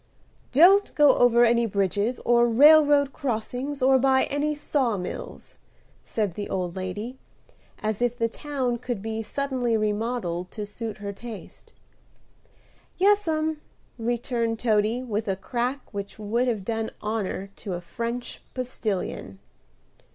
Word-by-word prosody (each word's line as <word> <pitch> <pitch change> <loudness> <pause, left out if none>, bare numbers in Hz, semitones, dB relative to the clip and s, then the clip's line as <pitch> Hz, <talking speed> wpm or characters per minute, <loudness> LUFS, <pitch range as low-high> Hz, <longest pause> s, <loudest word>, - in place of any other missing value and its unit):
"Don't 370 +9 +6
go 295 -2 +6
over 240 0 +5
any 235 0 +3
bridges 200 +4 0
or 240 0 +5
railroad 290 +2 +6
crossings 260 +2 -3
or 265 0 +5
by 265 0 +4
any 295 +2 -1
saw 270 -6 0
mills," 180 - -7 0.5
said 210 -5 -2
the 205 +3 -5
old 180 -2 -2
lady, 205 +7 -5 0.6
as 215 +1 -1
if 245 0 +1
the 230 - +1
town 255 -1 -3
could 240 -4 -4
be 225 0 -3
suddenly 250 -1 -1
remodelled 210 -4 -2
to 210 +2 -5
suit 220 +1 -6
her 200 -1 -5
taste. 225 0 -10 1.3
"Yes'm," 320 -6 +2 0.4
returned 235 0 -1
Toady, 220 +1 +1
with 220 -2 -3
a 195 - +1
crack 245 +7 -2
which 200 0 -6
would 225 +4 0
have 215 -6 -1
done 225 0 -2
honor 205 -2 -3
to 195 - -5
a 175 - -3
French 235 +7 -5
postilion. 215 - -3
235 Hz, 130 wpm, -25 LUFS, 210-260 Hz, 1.3 s, Don't